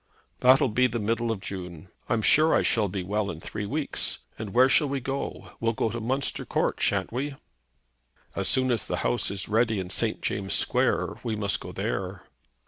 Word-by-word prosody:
"That'll 130 +1 +5
be 125 +4 +3
the 120 -1 -3
middle 115 +2 -1
of 105 -4 -4
June. 90 -3 -7 0.2
I'm 110 -1 +1
sure 155 +10 +5
I - - +3
shall 110 -3 +2
be 95 0 -3
well 100 +2 -1
in 80 - -6
three 105 +4 -5
weeks. 145 +5 -1 0.2
And 110 -2 -5
where 125 +4 +6
shall 140 +2 +4
we 140 0 -1
go? 135 +2 -5
We'll 115 0 +1
go 110 0 -1
to 120 - -4
Munster 130 +4 -1
Court, - - -1
shan't - - +1
we?" 135 +3 -3 1.0
"As - - 0
soon 130 -1 +3
as 115 -3 +1
the - - -2
house - - +1
is 100 -3 -3
ready 110 0 +2
in 90 -1 -4
St. - - +1
James' 95 -1 0
Square, - - +1
we 115 -2 -2
must 100 -2 0
go - - -8
there." - - -3
115 Hz, 200 wpm, -26 LUFS, 100-130 Hz, 1.0 s, where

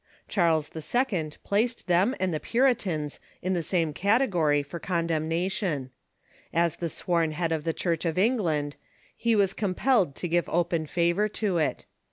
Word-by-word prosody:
Charles 165 -5 +1
II. 180 - 0
placed 230 +4 0
them 185 +9 +3
and 185 -2 0
the 155 - -1
Puritans 200 - 0 0.2
in 185 +1 0
the 175 - 0
same 165 -2 0
category 180 - +2
for 170 +4 -7
con 170 -2 -1
demnation. 165 - -1 0.6
As 170 -1 +1
the 170 - -2
sworn 165 -1 0
head 165 +1 -1
of 160 -1 -1
the 165 - +2
Church 165 0 -1
of 165 -1 -1
England, 175 - +1 0.4
he 230 -1 +1
was 195 -2 +3
compelled 200 - +1
to 175 - -3
give 175 +1 +1
open 170 -2 0
favor 175 +6 +1 0.2
to 190 -4 +1
it. 155 - -1
170 Hz, 160 wpm, -27 LUFS, 160-200 Hz, 0.6 s, them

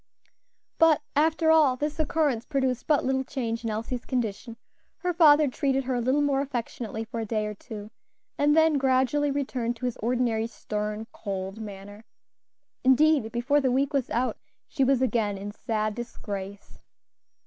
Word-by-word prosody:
But, 325 -2 +5
after 320 +2 +3
all, 305 -5 +5
this 295 +4 -3
occurrence 295 -6 +1
produced 265 -3 -1
but 300 -2 +2
little 265 0 +1
change 230 -4 -3
in 230 - -2
Elsie's 230 +3 -3
condition; 230 -2 -3 0.4
her 360 -1 -2
father 305 -3 +6
treated 270 0 0
her 260 0 -2
a 245 - 0
little 265 +5 +2
more 275 -1 +1
affectionately 235 -4 -4
for 230 +1 -6
a 225 - -2
day 215 -1 -1
or 210 - -4
two, 210 0 -9 0.4
and 295 +2 +3
then 320 -2 +4
gradually 265 +2 +2
returned 260 -4 -2
to 240 - -6
his 245 - -2
ordinary 230 -1 0
stern, 210 -1 -4
cold 195 0 -5
manner; 205 0 -9 0.8
indeed, 265 -2 +4
before 265 +5 +1
the 260 -2 +1
week 275 +3 +1
was 275 -3 0
out, 250 +2 -1 0.3
she 275 - 0
was 265 -1 +3
again 215 -5 0
in 200 +1 -6
sad 215 0 -2
disgrace. 200 -4 -7
250 Hz, 160 wpm, -26 LUFS, 220-280 Hz, 0.8 s, father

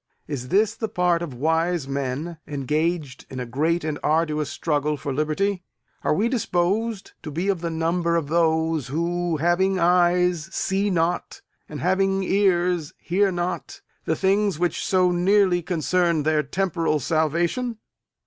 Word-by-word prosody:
Is 130 -4 -4
this 205 - +2
the 225 -1 -4
part 180 -2 +1
of 155 -7 -5
wise 160 +2 0
men, 140 +4 -3
engaged 150 +1 -2
in 130 - -6
a 125 - -3
great 155 +8 0
and 155 -1 -3
arduous 155 -1 +1
struggle 150 -1 -1
for 140 -1 -4
liberty? 165 +7 0 0.4
Are - - +2
we 210 +7 +2
disposed 210 -2 -1
to 155 - -7
be 170 +7 -2
of 190 -4 0
the 170 - -2
number 170 +1 0
of 165 -3 0
those 160 -3 +1
who, 170 +3 -1
having 175 +4 +2
eyes, 175 -1 +2
see 195 +2 0
not, 175 -1 -1 0.3
and 150 - -6
having 195 +2 +1
ears, 180 -5 +1
hear 195 +3 +1
not, 175 0 -4 0.2
the - - +1
things 200 -2 +1
which 175 +1 -1
so 185 -1 +3
nearly 180 0 +3
concern 170 -1 +1
their 155 0 +2
temporal 165 -1 -1
salvation? 170 - 0
170 Hz, 150 wpm, -23 LUFS, 155-185 Hz, 0.4 s, so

